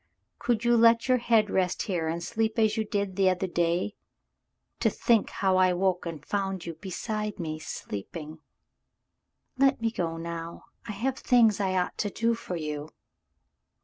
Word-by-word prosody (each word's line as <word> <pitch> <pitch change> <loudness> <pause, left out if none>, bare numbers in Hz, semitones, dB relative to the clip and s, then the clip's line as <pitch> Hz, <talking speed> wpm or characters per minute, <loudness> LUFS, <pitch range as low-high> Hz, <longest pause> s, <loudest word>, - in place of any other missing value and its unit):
Could 235 -1 0
you 240 0 +5
let 230 +1 +5
your 255 -1 +4
head 225 -3 +3
rest 185 -1 +1
here 175 -6 -1
and 170 +2 -2
sleep 220 +3 -1
as 220 -1 +3
you 220 - 0
did 200 -3 -2
the 190 -1 +4
other 185 +1 0
day? 175 +2 0 0.9
To - - +3
think 230 -4 +2
how 190 -1 +1
I 185 -1 +4
woke 180 -1 0
and 155 -4 -7
found 195 -2 -2
you 170 - -4
beside 210 +5 -4
me 155 -2 -4
sleeping 155 - -7 0.4
— - - -54
" - - -49
"Let 270 0 +4
me 225 0 0
go 165 -6 -2
now. 165 0 -6 0.2
I 210 - -4
have 255 +6 -2
things 230 -5 +4
I 190 -2 0
ought 180 - -1
to 205 - 0
do 230 +3 +1
for 225 -5 -5
you." 150 -2 -4
190 Hz, 180 wpm, -28 LUFS, 170-225 Hz, 0.9 s, you